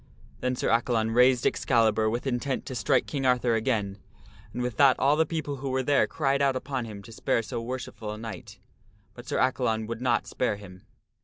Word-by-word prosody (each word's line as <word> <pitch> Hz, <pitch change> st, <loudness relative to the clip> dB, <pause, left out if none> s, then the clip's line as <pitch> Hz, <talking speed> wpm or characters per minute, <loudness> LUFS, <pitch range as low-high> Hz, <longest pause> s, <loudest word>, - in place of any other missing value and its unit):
Then 125 Hz, 0 st, -1 dB
Sir -, -, -1 dB
Accalon 115 Hz, -1 st, +1 dB
raised 125 Hz, 0 st, +4 dB
Excalibur 110 Hz, -3 st, +2 dB
with 120 Hz, +4 st, -3 dB
intent 130 Hz, +1 st, -2 dB
to -, -, -6 dB
strike 130 Hz, +2 st, +1 dB
King 140 Hz, -3 st, -3 dB
Arthur 125 Hz, -2 st, +2 dB
again, 110 Hz, -4 st, -1 dB, 0.5 s
and 125 Hz, -, -3 dB
with 125 Hz, -3 st, -3 dB
that 140 Hz, -2 st, +6 dB
all 140 Hz, +3 st, +3 dB
the 160 Hz, +1 st, +2 dB
people 150 Hz, -4 st, -3 dB
who 135 Hz, 0 st, -4 dB
were 130 Hz, 0 st, 0 dB
there 140 Hz, +2 st, +3 dB
cried 140 Hz, -2 st, 0 dB
out 135 Hz, -1 st, +2 dB
upon 130 Hz, -1 st, -3 dB
him 105 Hz, -3 st, -9 dB
to 115 Hz, -, -12 dB
spare 115 Hz, +1 st, 0 dB
so 115 Hz, -, -4 dB
worshipful 115 Hz, -3 st, -5 dB
a 105 Hz, -, -6 dB
knight. 110 Hz, -2 st, -8 dB, 0.6 s
But 120 Hz, +1 st, -12 dB
Sir -, -, -1 dB
Accalon 125 Hz, -4 st, +1 dB
would 115 Hz, +1 st, -5 dB
not 120 Hz, -3 st, +1 dB
spare 125 Hz, -, -1 dB
him. 95 Hz, -2 st, -13 dB
125 Hz, 205 wpm, -27 LUFS, 110-130 Hz, 0.6 s, that